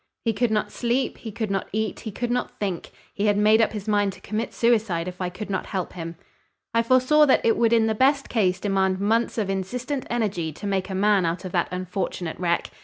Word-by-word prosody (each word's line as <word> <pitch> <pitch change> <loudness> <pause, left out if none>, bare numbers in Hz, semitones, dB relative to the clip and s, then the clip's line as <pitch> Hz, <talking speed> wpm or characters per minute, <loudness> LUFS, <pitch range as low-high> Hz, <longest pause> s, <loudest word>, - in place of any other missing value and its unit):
He 225 - +2
could 240 +3 +1
not 210 -1 0
sleep, 245 +2 -1
he 225 - -7
could 215 0 -3
not 195 -1 -1
eat, 215 +1 -2
he 220 - -6
could 240 +4 -3
not 245 0 -2
think, 190 -5 -3 0.2
he 205 +1 0
had 205 -1 +3
made 215 +2 +5
up 225 - +2
his 210 -1 -6
mind 205 -2 +2
to - - -14
commit 215 +2 -3
suicide 215 -8 +1
if 180 +1 -7
I 180 - -1
could 200 +3 -7
not 190 - -2
help 185 -3 -3
him. 165 -1 -6 0.6
I 230 - +4
foresaw 255 +5 +4
that 265 - +3
it 225 - +4
would 230 -1 +2
in 230 -1 +4
the 220 - +1
best 275 +4 +2
case 185 -6 +1
demand 190 -2 +1
months 225 +5 +1
of 215 -3 0
insistent 245 +8 -3
energy 200 -9 -1
to 205 - -9
make 195 -1 -1
a 190 - -3
man 200 0 +3
out 170 +3 -2
of 185 - -5
that 175 -1 +1
unfortunate 180 -2 -4
wreck. 170 -1 0
210 Hz, 235 wpm, -24 LUFS, 185-230 Hz, 0.6 s, made